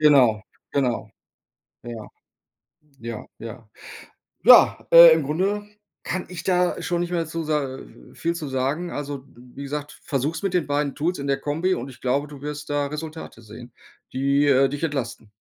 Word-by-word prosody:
Genau, 130 -8 +5 0.3
genau. 130 -4 0 0.7
Ja. 115 -2 -7 0.9
Ja, 115 -2 -6 0.2
ja. 115 -1 -9 0.7
Ja, - - +7
äh, 170 -1 +11
im 160 -1 +1
Grunde 190 +9 -1 0.4
kann 185 - -3
ich 180 -2 -7
da 180 -1 +1
schon 175 -1 -1
nicht 175 - -2
mehr 170 -2 0
zu 165 +1 -4
sa 150 -4 -2 0.3
viel 170 +1 -2
zu 155 -3 -5
sagen. 135 +7 -1
Also, 140 -2 -5
wie 125 +3 -11
gesagt, 145 +1 -6
versuch's 150 +3 -2
mit 195 -2 -1
den 180 -4 +1
beiden 145 -1 0
Tools 170 +5 -1
in 140 - -4
der 135 -1 +1
Kombi, 160 +7 0
und 125 +3 -6
ich 130 - -13
glaube, 135 +3 0
du 145 -2 -12
wirst 150 0 -6
da 145 -1 0
Resultate 155 -4 -7
sehen, 115 +2 -12 0.4
die, 140 +2 +2
äh, 135 -1 +4
dich 145 +3 -5
entlasten. 120 -8 -3
145 Hz, 165 wpm, -23 LUFS, 130-160 Hz, 0.9 s, äh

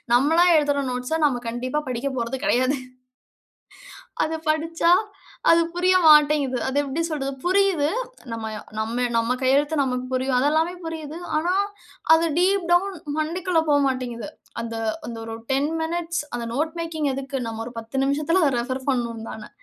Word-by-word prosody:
நம்மளா 320 +7 +4
எழுதுற 285 -2 +1
நோட்ஸ 250 +6 -2
நம்ம 250 -4 +1
கண்டிப்பா 255 +5 -2
படிக்க 255 +3 -2
போறது 235 +2 -2
கெடையாது. 255 +3 +2 1.5
அத 315 - -2
படிச்சா, 325 +2 +1 0.6
அது 335 0 +6
புரிய 365 +1 +3
மாட்டேங்குது. 300 -3 +5
அது 265 +1 -1
எப்டி 285 +3 -2
சொல்றது? 275 -3 -2
புரியிது. 370 -5 +3 0.4
நம்ம 225 -1 -4 0.3
நம்ம 230 +3 -1
நம்ம 230 +2 +1
கையெழுத்து 285 +4 +3
நமக்கு 250 -1 -2
புரியும். 260 0 0
அதுல்லாமே 315 +5 +2
புரியிது. 320 -1 -6 0.2
ஆனா, 345 +4 +1 0.6
அது 325 +1 +4
டீப் 370 0 +2
டவுன் 380 +2 +3 0.2
மண்டைக்குள்ள 335 +2 0
போ 290 - +5
மாட்டேங்குது. 245 -4 -3 0.3
அந்த 230 0 -5 0.3
அந்த 235 - -6
ஒரு 225 0 -6 0.2
10 280 +4 +1
மினிட்ஸ் 335 0 -2
அந்த 240 -1 -3
நோட் 310 +5 -1
மேக்கிங் 315 -3 -2
எதுக்கு? 270 0 -4
நம்ம 225 0 -4
ஒரு 245 - -9
10 225 +4 -7
நிமிஷத்துல 300 +6 +2
அத 285 - +3
ரெஃபர் 255 +2 -4
பண்ணணும்ன் 235 -3 -2
தானே? 220 -1 -9
285 Hz, 150 wpm, -23 LUFS, 250-325 Hz, 1.5 s, அது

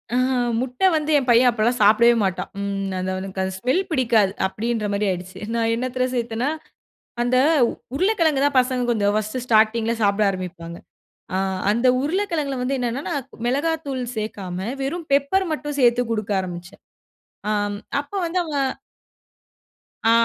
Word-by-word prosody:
ஆஹ 255 +1 +2 0.3
முட்டை 255 +9 +1
வந்து 310 0 0
என் 260 -2 -1
பையன் 245 +1 +6
அப்பலாம் 235 +2 +1
சாப்டவே 235 +3 +6
மாட்டான். 190 -1 -2
ம் 195 -1 -2
அந்த 185 +1 -2
அவனுக்கு 190 0 -4
அந்த 190 0 -3
ஸ்மெல் 255 - +1
பிடிக்காது 225 -8 +2
அப்டின்ற 220 +2 -2
மாரி 205 +1 0
ஆயிடுச்சு. 185 +1 -6
நான் 230 -1 +1
என்னத்தல 255 +1 -1
சேர்த்தனா, 235 +3 -1 0.7
அந்த 245 +1 +2 0.6
உருளக்கிழங்கு 330 -6 +2
தான், 280 -2 +2
பசங்க 255 -1 0
கொஞ்சம் 205 -3 +1
ஃபர்ஸ்ட்டு 215 +4 -2
ஸ்டார்ட்டிங்கில 225 0 +3
சாப்ட 200 +1 +2
ஆரம்பிப்பாங்க. 175 -3 -6 0.6
அ - - +1 0.3
அந்த 235 +4 +2
உருளக்கிழங்குல 315 -4 -1
வந்து 270 +2 0
என்னென்னா, 245 +3 -2
நான் 275 -3 -3 0.2
மிளகாத்தூள் 280 -1 -1
சேக்காம 200 -4 -4 0.2
வெறும் 320 +4 -3
பெப்பர் 285 +8 +2
மட்டும் 295 -1 -4
சேத்து 245 0 +4
குடுக்க 215 -2 -2
ஆரம்பிச்சேன். 180 0 -8 0.7
அம் 205 -1 -1 0.2
அப்ப 285 +6 -12
வந்து 345 +2 -1
அவ 315 - -7 1.6
ஆ, - - +6
240 Hz, 140 wpm, -22 LUFS, 205-275 Hz, 1.6 s, பையன்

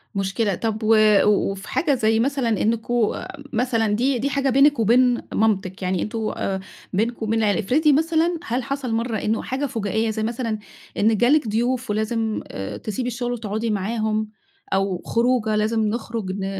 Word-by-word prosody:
مشكلة، 195 +1 0
طَب 220 +1 -3
و 220 +1 +5 0.3
وفي 195 -1 +1
حاجة 305 -4 +1
زي 220 -1 +2
مثلًا 265 -1 0
إنُّكم 225 +1 +1 0.4
مثلًا 230 -1 +1
دي، 255 +2 +1
دي 280 - 0
حاجة 275 -1 0
بينِك 275 +1 +4
وبين 245 +2 +4
مامتِك، 195 -3 0
يعني 185 -1 -1
أنتم 220 0 -2
آآ، 190 -1 -2 0.3
بينكم 225 +3 -1
وبين 225 +1 0
العيلة 210 -1 +2
افرضي 290 - +3
مثلًا، 325 +3 +2
هل 245 +2 -1
حصل 275 -3 -3
مرة 230 0 -1
إنه 215 +2 -1
حاجة 270 +3 -2
فُجائية، 220 -2 -1
زي 220 0 -2
مثلًا 230 -1 -2 0.4
إن 215 +1 +3
جه 240 - +3
لِك 295 -4 +3
ضيوف 245 +4 -1
ولازم 220 +1 -1
آآ، 95 0 -6
تسيبي 225 +4 -4
الشغل 245 0 -3
وتقعدي 220 0 -3
معاهم، 215 +1 -1 0.4
أو 190 -2 0
خروجة 230 -2 +1
لازم 220 +1 +1
نخرج 225 -3 -3
ن 195 - -2
225 Hz, 165 wpm, -22 LUFS, 215-245 Hz, 0.4 s, و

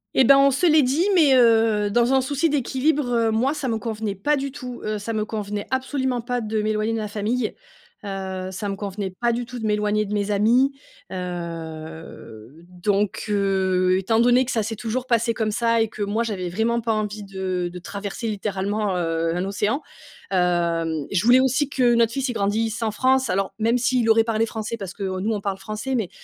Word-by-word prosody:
Et 265 - +5
ben, 275 +3 +7
on 275 0 +5
se 290 +7 +2
l'est 310 -2 +5
dit, 285 +9 +1
mais, 305 -6 +5
heu, 225 -4 +4
dans 240 +4 +2
un 265 - +4
souci 285 +5 0
d'équilibre, 285 +1 +1 0.2
heu, - - 0
moi, 250 +6 +1
ça 290 -3 -3
me 225 -2 -1
convenait 220 -2 -3
pas 290 +10 +1
du 275 0 -3
tout. 250 -2 -7
Heu, 215 0 -2
ça 205 +3 -4
me 215 -1 -1
convenait 210 -2 -4
absolument 260 -1 -1
pas 245 +1 -2
de 215 -1 -2
m'éloigner 215 +1 0
de - - -1
ma 215 - -3
famille. 215 +3 -2 0.5
Heu, 190 -1 -4
ça 200 +2 -4
me 195 - -2
convenait 200 0 -4
pas 240 0 +3
du 240 +1 -2
tout 250 +1 -8
de 220 - -4
m'éloigner 210 0 +1
de 205 - -5
mes 205 -1 -1
amis. 235 +7 +3 0.4
Heu, 165 - -7
donc 195 +3 -1
heu, 190 -2 +2
étant 220 +4 +1
donné 245 +2 +4
que 255 - -3
ça 225 - +1
s'est 225 +2 -3
toujours 240 +4 -3
passé 235 -1 +2
comme 220 -1 -1
ça 230 +1 +2
et 225 - +2
que 210 -1 -5
moi, 205 +3 -1
j'avais 195 -6 -3
vraiment 225 +6 0
pas 225 0 0
envie 210 -1 -3
de 190 -2 -3
de 180 - -7
traverser, 200 +5 -5
littéralement, 205 -1 -2
heu, 165 -1 -1
un 180 +1 -1
océan, 205 +8 -1 0.5
hem, 170 -4 +1
je 185 -1 +1
voulais 245 +2 +7
aussi 265 +2 +1
que 250 -4 +3
notre 235 -1 +3
fils, 270 +2 -2
il 245 - -2
grandisse 220 +2 -1
en 225 - +1
France. 260 +2 +2
Alors, 195 0 -1
même 230 +3 +2
s'il 245 -1 +1
aurait 225 0 +5
parlé 225 0 +1
français, 220 +1 -4
parce 195 -3 -7
que, 200 - -7
heu, 190 -1 -2
nous, 215 +4 0
on 215 - -1
parle 195 -1 -2
français, 215 +7 -4
mais, 220 -7 -1
215 Hz, 215 wpm, -23 LUFS, 195-240 Hz, 0.5 s, ben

